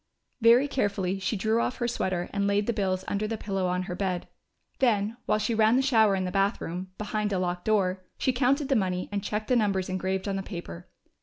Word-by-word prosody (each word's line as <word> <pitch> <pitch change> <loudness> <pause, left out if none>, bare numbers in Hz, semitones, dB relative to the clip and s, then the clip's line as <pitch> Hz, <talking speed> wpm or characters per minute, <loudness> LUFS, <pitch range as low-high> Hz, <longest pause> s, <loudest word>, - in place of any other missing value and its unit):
Very 235 +5 +6
carefully 200 -8 -1
she 195 +3 -1
drew 220 +4 +1
off 250 - -2
her 240 - -1
sweater 185 -7 -1
and 200 0 +1
laid 200 +1 +2
the 235 - 0
bills 190 -3 -1
under 205 +1 -1
the 225 0 -3
pillow 195 -3 -2
on 180 +1 0
her 180 -1 -5
bed. 180 -1 -2 0.5
Then, 220 -4 +2
while - - +3
she 215 +2 -1
ran 220 +1 +4
the 265 - +3
shower 220 -7 +4
in 190 -1 -1
the 180 - -3
bathroom, 190 -2 -1
behind 210 0 -2
a 195 - +1
locked 180 -1 -2
door, 190 -3 +1
she 260 - +1
counted 275 +3 +2
the 270 - +3
money 185 -4 0
and 200 -1 -2
checked 215 +1 -3
the 250 - +3
numbers 200 -5 +1
engraved 185 +1 -2
on 195 -1 -1
the - - -2
paper. 170 - -8
200 Hz, 225 wpm, -27 LUFS, 185-220 Hz, 0.5 s, Very